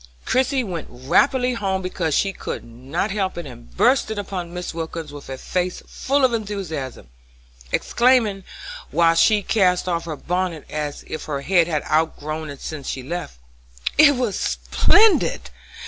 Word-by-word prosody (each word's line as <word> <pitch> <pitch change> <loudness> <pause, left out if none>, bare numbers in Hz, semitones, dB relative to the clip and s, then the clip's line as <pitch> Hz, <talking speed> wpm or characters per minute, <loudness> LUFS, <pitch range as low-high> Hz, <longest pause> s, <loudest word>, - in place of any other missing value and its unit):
Christie 260 +1 +2
went 175 -7 -5
rapidly 245 - +2
home 190 -4 -1
because 170 -4 -1
she 195 -1 +1
could - - -5
not 130 - -3
help 190 -3 -1
it, 175 - -5
and - - -11
burst 265 - +4
in 220 - -4
upon 185 -4 -4
Mrs. 180 -1 -5
Wilkins 160 -2 -5
with 145 -2 -10
a 130 - -5
face 180 +4 -2
full 275 0 +1
of 250 - +1
enthusiasm, 190 - -4 0.6
exclaiming, 235 -6 +2 0.5
while 165 -1 +4
she 205 +5 +4
cast 185 -3 +2
off 170 -2 -1
her 160 -2 -4
bonnet 175 0 -2
as 150 -1 -4
if 155 - -6
her 140 -2 -3
head 175 +2 +3
had 155 -3 -1
outgrown 155 0 -1
it 140 -1 -9
since 150 -4 -6
she 130 - -4
left: 170 - -5 0.6
"It 290 -1 +7
was 245 -5 -1
splendid! 320 - +3
175 Hz, 160 wpm, -22 LUFS, 155-210 Hz, 0.6 s, It